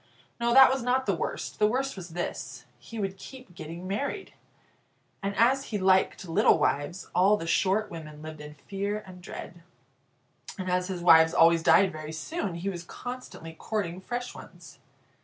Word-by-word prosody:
No, 235 0 +1
that 265 -1 +9
was 265 - -2
not 255 +2 +1
the - - +1
worst. - - -4
The 210 - +5
worst 265 +5 -1
was 180 -3 -8
this 175 +1 -5
he 230 - -10
would 195 -2 -3
keep 255 -2 -12
getting 170 +2 -8
married. 280 - -3 0.9
And 200 0 -3
as 265 +5 +3
he 210 - -3
liked 190 -1 +2
little 165 - +4
wives, 145 +7 -1
all 195 +4 +4
the 165 - -6
short 190 +6 +1
women 155 -2 -9
lived 155 -1 -8
in 150 0 -10
fear 200 +7 -4
and 180 -1 -12
dread. 175 -1 -9 1.0
And 185 -2 -3
as 180 0 +1
his 180 -3 -5
wives 160 -1 +6
always 165 0 +5
died 190 +3 +5
very 155 -1 -7
soon, 190 - -4
he 170 +3 -5
was 175 -3 -3
constantly 245 -6 -8
courting 185 0 -4
fresh 245 +4 -4
ones. - - -13
190 Hz, 175 wpm, -28 LUFS, 170-220 Hz, 1.0 s, that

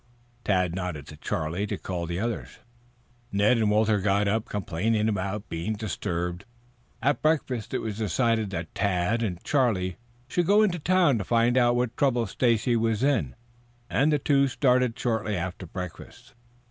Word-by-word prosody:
Tad 90 -4 +1
nodded 90 -6 -4
to 75 - -9
Charlie 80 +6 -2
to - - -3
call 85 -2 -4
the 85 +1 -3
others. 115 +1 -4 0.7
Ned 105 +4 +3
and 110 -2 +2
Walter 105 0 +3
got 100 +1 +1
up 110 +2 0
complaining 105 +3 0
at 100 +2 -3
being 85 +6 -3
disturbed. 90 -4 -3 0.6
At 145 - +2
breakfast 135 -8 0
it - - -2
was 110 -1 -4
decided 110 0 +1
that 85 -3 -5
Tad 100 +3 0
and 95 -6 -3
Charlie 105 -10 +1 0.3
should 175 +5 0
go 210 +2 +5
into 180 -5 +1
town 170 -6 +3
to - - -2
find 120 +4 +2
out 120 -1 +4
what 120 -1 -1
trouble 125 -4 +2
Stacy 120 +2 +1
was 115 0 0
in, 125 - +1 0.6
and 145 +4 +3
the 150 - +3
two 140 0 +3
started 125 -2 +2
shortly 110 -5 -1
after 90 +1 -5
breakfast. 95 +8 -9
110 Hz, 160 wpm, -26 LUFS, 95-125 Hz, 0.7 s, go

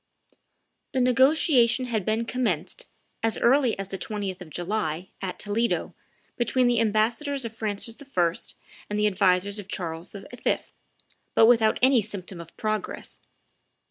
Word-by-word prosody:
The 265 - +1
negotiation 255 -1 +4
had 220 -6 -2
been 220 +2 0
commenced, 255 - -2 0.3
as 225 0 0
early 255 -1 +3
as 195 -1 -5
the 195 - -5
20th 200 -4 -4
of 175 - -9
July, 175 -1 -3
at 190 -2 -4
Toledo, 220 +3 -1 0.4
between 250 +1 +2
the 240 -1 +3
ambassadors 230 +6 +1
of 225 -1 -6
Francis 220 +1 -4
I. 180 -12 +1 0.6
and 210 - -2
the 210 - +2
advisers 200 0 +2
of 200 - -8
Charles 170 -4 -5
V., 200 - -10 1.1
but 225 - +7
without 225 -2 +5
any 260 -2 +6
symptom 190 -4 -6
of 170 0 -14
progress. 215 -1 -3
215 Hz, 140 wpm, -26 LUFS, 195-240 Hz, 1.1 s, but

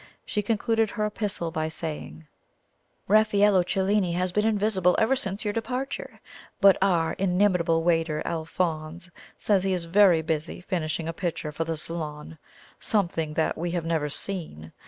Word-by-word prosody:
She 210 - -1
concluded 225 +1 +1
her 215 -1 -2
epistle 210 -5 -3
by 155 0 -2
saying: 150 - -6 0.8
"Raffaello 205 -2 +4
Cellini 190 0 +1
has 180 +1 0
been 210 +4 +1
invisible 205 -4 +2
ever 235 +5 +3
since 200 -5 -2
your 205 - 0
departure, 250 +4 -4 0.4
but 195 -1 +7
our 175 -4 +2
inimitable 180 -3 +2
waiter, 165 -2 +1
Alphonse, 165 +1 -3 0.3
says 200 -3 +2
he 195 -1 +1
is 175 -2 -2
very 175 -2 +5
busy 155 -1 -3
finishing 165 -4 -3
a 165 - -3
picture 165 -3 -3
for 165 +2 -3
the 165 -1 -3
Salon 155 -1 -6 0.4
something 170 -7 0
that 160 - +1
we 175 +2 -3
have 165 - -3
never 160 -3 0
seen. 145 - -5
175 Hz, 150 wpm, -26 LUFS, 160-205 Hz, 0.8 s, but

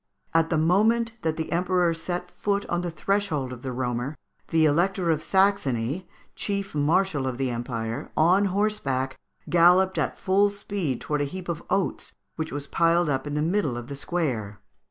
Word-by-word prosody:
At 165 0 +3
the 165 - +1
moment 215 +8 +3
that 160 -1 -1
the 160 - -3
Emperor 180 0 +2
set 175 +2 -4
foot 200 0 -1
on 175 0 -1
the 175 - -2
threshold 160 -6 -1
of 120 - -10
the 130 - -4
Roemer, 125 +3 -2 0.3
the 160 -1 +3
Elector 175 +3 +2
of 155 -1 0
Saxony, 180 - +1 0.3
Chief 200 -1 -3
Marshal 150 -1 +1
of 125 -2 -3
the 130 -1 -1
Empire, 115 -1 -4
on 180 +6 +4
horseback, 185 -10 -1 0.3
galloped 180 +1 +5
at - - -1
full 200 +2 +3
speed 200 - -3
towards 150 -1 -1
a - - -4
heap 185 +4 -7
of 170 -1 -3
oats 195 - -1 0.2
which 160 -1 -4
was 145 0 -4
piled 170 +2 +2
up 135 +2 -1
in 145 - -3
the 150 - +1
middle 165 -7 0
of 120 +2 -7
the 140 - -5
square. 130 - -2
165 Hz, 175 wpm, -26 LUFS, 140-190 Hz, 0.3 s, galloped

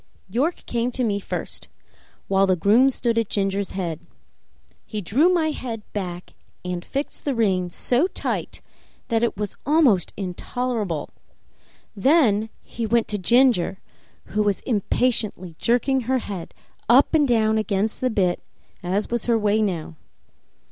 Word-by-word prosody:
York 280 - -1
came 240 +1 -1
to 255 - 0
me 205 -3 0
first, - - -4 0.6
while 195 0 +3
the 185 - +3
groom 215 +10 +4
stood 235 -3 0
at 225 - -2
Ginger's 195 -1 -1
head. 170 -5 -3 0.8
He 215 - -5
drew 250 - +3
my 330 -4 +2
head 230 -7 -5
back 180 -3 -5 0.3
and 180 -1 -3
fixed 280 +2 -4
the 280 -3 -1
rein 190 -6 +1
so 250 - +1
tight - - -3 0.5
that 225 -1 +2
it 235 -4 0
was 210 -1 -4
almost 275 - +3
intolerable; 200 - -3 0.8
then 220 - +3
he 230 -1 -4
went 235 +1 +2
to 210 - -1
Ginger, 235 -3 +3 0.5
who 210 - 0
was 205 -2 0
impatiently 215 -5 0
jerking 255 +3 +2
her 260 +2 0
head 195 -8 -6 0.3
up 255 +7 +5
and 300 -3 +4
down 220 -2 +2
against 215 0 -1
the 255 - +2
bit, 185 -6 +1 0.4
as 190 +5 -2
was 235 -2 -1
her 235 -2 +3
way 210 0 +2
now. 170 -6 -2
220 Hz, 145 wpm, -23 LUFS, 195-250 Hz, 0.8 s, up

